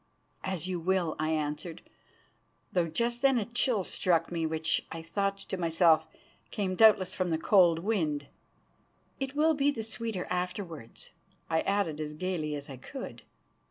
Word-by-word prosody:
"As 185 Hz, -2 st, -3 dB
you 185 Hz, -2 st, -2 dB
will," 175 Hz, -2 st, +1 dB
I 155 Hz, 0 st, 0 dB
answered, 155 Hz, +2 st, -3 dB, 0.9 s
though 175 Hz, -2 st, +2 dB
just 235 Hz, +9 st, -1 dB
then 270 Hz, -2 st, +4 dB
a 220 Hz, -, 0 dB
chill 235 Hz, -2 st, +1 dB
struck 170 Hz, -2 st, +1 dB
me, 165 Hz, -2 st, 0 dB
which, 160 Hz, 0 st, 0 dB
I 165 Hz, 0 st, -6 dB
thought 195 Hz, +3 st, -1 dB
to 195 Hz, -1 st, -5 dB
myself, 165 Hz, -2 st, +4 dB, 0.4 s
came 195 Hz, -3 st, -2 dB
doubtless 190 Hz, -3 st, +5 dB
from 185 Hz, -1 st, -1 dB
the 160 Hz, -, +1 dB
cold 175 Hz, -1 st, +5 dB
wind. 165 Hz, -7 st, -1 dB, 0.9 s
"It 270 Hz, 0 st, -3 dB
will 315 Hz, +2 st, +4 dB
be 285 Hz, -1 st, +2 dB
the 230 Hz, -6 st, -2 dB
sweeter 225 Hz, -4 st, -3 dB
afterwards," 180 Hz, -, -5 dB, 0.4 s
I 160 Hz, -, +3 dB
added 195 Hz, -7 st, 0 dB
as 150 Hz, 0 st, -4 dB
gaily 155 Hz, -2 st, -2 dB
as 145 Hz, -1 st, -7 dB
I 135 Hz, -, -8 dB
could. -, -, -8 dB
180 Hz, 160 wpm, -30 LUFS, 160-205 Hz, 0.9 s, doubtless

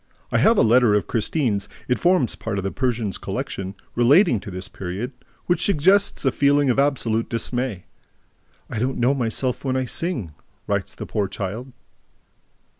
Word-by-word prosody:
I -, -, +2 dB
have 225 Hz, 0 st, +5 dB
a -, -, +5 dB
letter 115 Hz, -1 st, +5 dB
of 105 Hz, -, +1 dB
Christine's 110 Hz, -4 st, -1 dB, 0.2 s
(it 125 Hz, -, +1 dB
forms 175 Hz, -8 st, +2 dB
part 110 Hz, -3 st, -4 dB
of 100 Hz, -, -2 dB
the 95 Hz, -, -2 dB
Persian's 120 Hz, -7 st, -1 dB
collection), 95 Hz, +1 st, -4 dB, 0.2 s
relating 125 Hz, -, +4 dB
to 100 Hz, -, -9 dB
this 90 Hz, 0 st, -5 dB
period, 95 Hz, +7 st, -5 dB, 0.3 s
which 175 Hz, -, +1 dB
suggests 195 Hz, 0 st, +3 dB
a 135 Hz, -, +4 dB
feeling 140 Hz, 0 st, +3 dB
of 125 Hz, -, 0 dB
absolute 120 Hz, -5 st, +1 dB
dismay: 120 Hz, -3 st, -2 dB, 0.8 s
"I 110 Hz, -, -4 dB
don't 130 Hz, +3 st, -1 dB
know 125 Hz, +3 st, +3 dB
myself 125 Hz, +1 st, -1 dB
when 130 Hz, -2 st, -1 dB
I 130 Hz, 0 st, 0 dB
sing," 125 Hz, -, -2 dB, 0.3 s
writes -, -, -2 dB
the -, -, -6 dB
poor 100 Hz, -2 st, -1 dB
child. 105 Hz, +7 st, -5 dB
120 Hz, 165 wpm, -23 LUFS, 105-140 Hz, 0.8 s, have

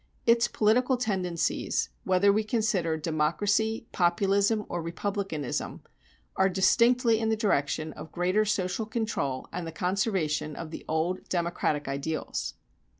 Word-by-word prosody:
Its 235 Hz, 0 st, +4 dB
political 250 Hz, +4 st, +2 dB
tendencies, 190 Hz, -8 st, -1 dB, 0.2 s
whether 190 Hz, +2 st, +4 dB
we 215 Hz, +1 st, +1 dB
consider 210 Hz, -7 st, 0 dB
Democracy, 195 Hz, +9 st, 0 dB
Populism, 200 Hz, +4 st, +2 dB
or 175 Hz, -, -3 dB
Republicanism, 170 Hz, -, -3 dB, 0.5 s
are 190 Hz, 0 st, +3 dB
distinctly 230 Hz, +5 st, +4 dB
in 225 Hz, -1 st, 0 dB
the 220 Hz, -, +2 dB
direction 155 Hz, -, 0 dB
of 160 Hz, -, -10 dB
greater 185 Hz, +4 st, +1 dB
social 205 Hz, 0 st, -1 dB
control 220 Hz, -, -2 dB
and 175 Hz, -1 st, -4 dB
the -, -, -5 dB
conservation 180 Hz, -4 st, -1 dB
of 165 Hz, -2 st, -7 dB
the -, -, -7 dB
old 160 Hz, +4 st, -1 dB
democratic 170 Hz, -4 st, -1 dB
ideals. 140 Hz, +3 st, -3 dB
190 Hz, 125 wpm, -28 LUFS, 165-215 Hz, 0.5 s, Its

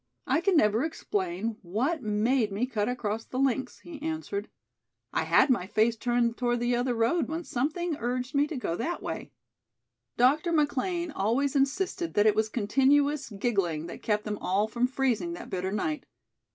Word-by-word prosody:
"I 320 Hz, -, +2 dB
can 360 Hz, -1 st, +3 dB
never 215 Hz, -1 st, +3 dB
explain 210 Hz, -, -2 dB
what 245 Hz, -, -1 dB
made 215 Hz, +2 st, +1 dB
me 205 Hz, +5 st, 0 dB
cut 220 Hz, -4 st, -1 dB
across 225 Hz, -3 st, -2 dB
the 255 Hz, -, -7 dB
links," 265 Hz, -1 st, 0 dB
he 320 Hz, -4 st, -10 dB
answered. 315 Hz, -10 st, -3 dB, 0.6 s
"I 160 Hz, -, 0 dB
had 215 Hz, -, +5 dB
my 190 Hz, -7 st, +1 dB
face 220 Hz, +3 st, +2 dB
turned 240 Hz, 0 st, 0 dB
toward 240 Hz, -1 st, 0 dB
the 240 Hz, 0 st, +2 dB
other 245 Hz, 0 st, 0 dB
road 235 Hz, +6 st, +2 dB
when 325 Hz, +3 st, -3 dB
something 310 Hz, +6 st, -1 dB
urged 250 Hz, +3 st, -2 dB
me 285 Hz, +1 st, +3 dB
to 305 Hz, -, -5 dB
go 170 Hz, -9 st, -2 dB
that 295 Hz, -, -3 dB
way." -, -, -5 dB, 0.9 s
Dr. 290 Hz, +8 st, +3 dB
McLean 325 Hz, +3 st, 0 dB
always 265 Hz, +5 st, 0 dB
insisted 330 Hz, +5 st, 0 dB
that 205 Hz, -, +4 dB
it 215 Hz, -, +6 dB
was 220 Hz, +1 st, +1 dB
continuous 275 Hz, +6 st, +2 dB
giggling 195 Hz, -8 st, -1 dB
that 170 Hz, -, -8 dB
kept 210 Hz, -1 st, 0 dB
them 210 Hz, -1 st, -4 dB
all 200 Hz, +3 st, +1 dB
from 240 Hz, +2 st, +1 dB
freezing 270 Hz, +5 st, 0 dB
that 345 Hz, -, -9 dB
bitter 185 Hz, 0 st, -2 dB
night. 160 Hz, -7 st, -2 dB
245 Hz, 175 wpm, -28 LUFS, 210-290 Hz, 0.9 s, it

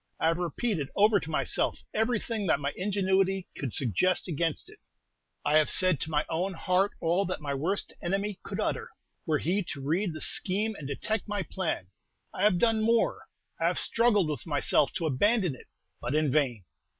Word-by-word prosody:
I 160 Hz, -, +3 dB
have 165 Hz, +1 st, 0 dB
repeated 175 Hz, -, -2 dB
over 210 Hz, 0 st, +5 dB
to 160 Hz, -, -8 dB
myself 155 Hz, -, 0 dB
everything 225 Hz, -2 st, -1 dB
that 160 Hz, -, +3 dB
my 140 Hz, 0 st, -2 dB
ingenuity 190 Hz, -1 st, +1 dB
could 135 Hz, -4 st, -4 dB
suggest 155 Hz, -, +1 dB
against 165 Hz, -1 st, -1 dB
it; -, -, -11 dB, 0.7 s
I 150 Hz, +2 st, +5 dB
have 155 Hz, -, +2 dB
said 185 Hz, -6 st, +4 dB
to -, -, -3 dB
my 150 Hz, -1 st, 0 dB
own 180 Hz, +4 st, -2 dB
heart 185 Hz, +4 st, +1 dB
all 170 Hz, +4 st, +2 dB
that 185 Hz, -, -3 dB
my 145 Hz, -2 st, -3 dB
worst 170 Hz, +9 st, -2 dB
enemy 195 Hz, +2 st, -2 dB
could -, -, -6 dB
utter, -, -, -2 dB, 0.4 s
were 155 Hz, -2 st, +2 dB
he 180 Hz, +8 st, 0 dB
to 145 Hz, -, -6 dB
read 165 Hz, +7 st, -1 dB
the 155 Hz, -, -7 dB
scheme 210 Hz, +4 st, +2 dB
and 150 Hz, -9 st, -8 dB
detect 215 Hz, +12 st, -2 dB
my 205 Hz, -2 st, -2 dB
plan; 160 Hz, -, -3 dB, 0.4 s
I -, -, -5 dB
have 205 Hz, -3 st, +4 dB
done 225 Hz, +2 st, +2 dB
more, 230 Hz, +1 st, +1 dB, 0.3 s
I -, -, +2 dB
have -, -, 0 dB
struggled 225 Hz, -6 st, +3 dB
with 150 Hz, +2 st, -4 dB
myself 145 Hz, -1 st, +2 dB
to 165 Hz, -, -2 dB
abandon 180 Hz, -, +2 dB
it; 130 Hz, -, -14 dB, 0.3 s
but 120 Hz, +4 st, -2 dB
in 155 Hz, -3 st, +2 dB
vain. 125 Hz, -8 st, +1 dB
180 Hz, 185 wpm, -28 LUFS, 150-205 Hz, 0.7 s, over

